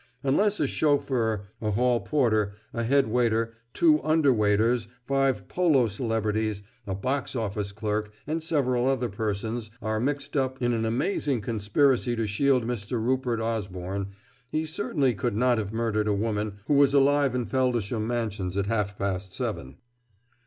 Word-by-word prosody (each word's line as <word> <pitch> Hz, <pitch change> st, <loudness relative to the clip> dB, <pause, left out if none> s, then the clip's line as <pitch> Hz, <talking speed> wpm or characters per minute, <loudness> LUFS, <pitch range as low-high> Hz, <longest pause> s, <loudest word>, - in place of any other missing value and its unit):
Unless 200 Hz, +10 st, +2 dB
a -, -, +2 dB
chauffeur, 130 Hz, -8 st, +1 dB, 0.2 s
a 110 Hz, -, -1 dB
hall 120 Hz, +3 st, +2 dB
porter, 110 Hz, -8 st, +1 dB, 0.2 s
a 115 Hz, -, -2 dB
head 135 Hz, +2 st, +3 dB
waiter, 115 Hz, -1 st, +1 dB, 0.2 s
two 315 Hz, -2 st, +4 dB
under 155 Hz, -4 st, +4 dB
waiters, 110 Hz, +2 st, +2 dB, 0.2 s
five 135 Hz, -7 st, +1 dB
polo 160 Hz, -9 st, +3 dB
celebrities, 110 Hz, -2 st, -1 dB, 0.2 s
a 95 Hz, -, -2 dB
box 130 Hz, +7 st, -2 dB
office 105 Hz, -3 st, -2 dB
clerk, 105 Hz, 0 st, -2 dB
and 160 Hz, +2 st, -2 dB
several 130 Hz, -6 st, +1 dB
other 130 Hz, -3 st, +1 dB
persons, 110 Hz, +2 st, -3 dB
are 110 Hz, 0 st, -2 dB
mixed 140 Hz, +3 st, -2 dB
up 130 Hz, -1 st, 0 dB
in 120 Hz, -1 st, +1 dB
an 115 Hz, -1 st, 0 dB
amazing 130 Hz, -, 0 dB
conspiracy 120 Hz, +4 st, +1 dB
to 115 Hz, -1 st, -1 dB
shield 125 Hz, +4 st, +2 dB
Mr. 115 Hz, -1 st, -4 dB
Rupert 125 Hz, 0 st, 0 dB
Osborne, 100 Hz, -4 st, -3 dB, 0.4 s
he 155 Hz, +1 st, 0 dB
certainly 155 Hz, -5 st, 0 dB
could 100 Hz, 0 st, -2 dB
not 120 Hz, +1 st, +3 dB
have 105 Hz, -2 st, -3 dB
murdered 110 Hz, -2 st, 0 dB
a 105 Hz, -, +2 dB
woman 105 Hz, 0 st, -1 dB
who 145 Hz, -, +1 dB
was 140 Hz, 0 st, +5 dB
alive 140 Hz, -1 st, +4 dB
in 125 Hz, -2 st, -1 dB
Feldisham 120 Hz, -4 st, 0 dB
Mansions 105 Hz, -6 st, -2 dB
at 100 Hz, -, +1 dB
half 105 Hz, -2 st, -1 dB
past 95 Hz, -1 st, -3 dB
seven." 65 Hz, 0 st, -4 dB
115 Hz, 155 wpm, -26 LUFS, 105-135 Hz, 0.4 s, was